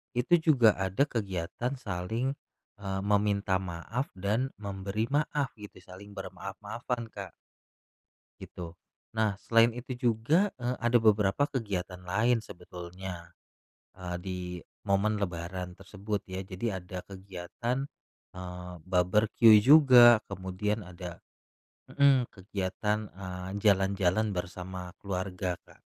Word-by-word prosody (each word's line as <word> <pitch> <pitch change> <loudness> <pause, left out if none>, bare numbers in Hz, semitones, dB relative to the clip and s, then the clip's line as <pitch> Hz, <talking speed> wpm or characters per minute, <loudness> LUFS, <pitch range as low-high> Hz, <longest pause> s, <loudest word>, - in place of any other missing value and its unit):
itu 125 +8 +1
juga 130 -9 +5
ada 95 +8 +2
kegiatan 105 - -3
saling, 110 +3 -2 0.5
eee, 95 -1 -3
meminta 100 -2 +2
maaf 95 +9 -4
dan 110 +8 -1
memberi 100 +1 -3
maaf, 145 -1 0
gitu, 105 - -11
saling 100 +2 -12
bermaaf-maafan, 105 +5 -5
Kak. 100 -3 -8 1.1
Gitu. 85 -2 -7 0.5
Nah, 105 -3 +2
selain 115 0 +4
itu 125 +1 -7
juga, 145 - +3
eee, 125 0 -2
ada 120 0 +4
beberapa 105 +4 +4
kegiatan 100 - -3
lain 110 +7 +2
sebetulnya, 90 -2 -9 0.6
eee, 90 -1 -5
di 90 0 -5 0.4
momen 100 +2 +2
lebaran 90 0 -4
tersebut, 100 +1 -4
ya. 95 +1 -4
Jadi 95 +5 -4
ada 90 0 -6
kegiatan, 100 +8 -4 0.5
eee, 90 0 -7
barbekyu 105 +5 +5
juga, 125 -6 +9
kemudian 100 +2 -3
ada 90 -1 -9 0.7
mhm, 140 -3 +5
kegiatan, 100 +2 -2 0.2
eee, 90 -1 -6
jalan-jalan 100 0 +3
bersama 90 0 -5
keluarga, 95 -1 -3
Kak. - - -21
100 Hz, 110 wpm, -30 LUFS, 90-115 Hz, 1.1 s, juga